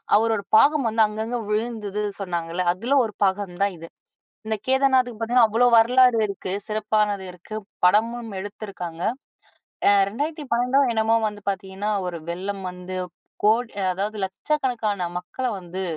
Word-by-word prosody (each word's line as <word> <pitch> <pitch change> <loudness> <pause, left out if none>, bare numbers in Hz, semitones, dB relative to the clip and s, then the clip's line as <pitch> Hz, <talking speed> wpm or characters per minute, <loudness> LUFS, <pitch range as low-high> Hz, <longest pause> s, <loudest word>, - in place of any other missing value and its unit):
அவரோட 220 -1 +2
பாகம் 285 +2 +5
வந்து 225 0 +2
அங்கங்க 220 +3 -4
விழுந்தது 210 -2 -2 0.2
சொன்னாங்கல்ல, 175 -2 -3
அதில 230 +10 -1
ஒரு 220 -3 -4
பாகம் 190 -2 -1
தான் 200 -1 +2
இது. 165 - -9 0.6
இந்த 220 0 0
கேதர்நாத்துக்கு 260 -3 +2
பாத்தீங்கன்னா, 235 0 +4
அவ்வளோ 230 +3 +3
வரலாறு 250 +1 +5
இருக்கு. 195 -1 -5 0.2
சிறப்பானது 210 -2 0
இருக்கு. 180 +4 -10 0.3
படமும் 230 +5 +2
எடுத்துருக்காங்க. 190 -4 -7 0.9
அ - - +8 0.2
2012ஓ 265 0 -1
என்னமோ 220 0 +2
வந்து 210 0 -9
பாத்தீங்கன்னா 195 +1 -3 0.2
ஒரு 175 -1 -4
வெள்ளம் 195 +3 -4
வந்து, 180 +1 -7 0.5
கோடி 225 +3 +3 0.2
அதாவது 205 +4 -3
லட்சக்கணக்கான 225 0 -1 0.2
மக்கள 180 +8 -7
வந்து, 185 +1 -6
215 Hz, 130 wpm, -23 LUFS, 190-235 Hz, 0.9 s, அ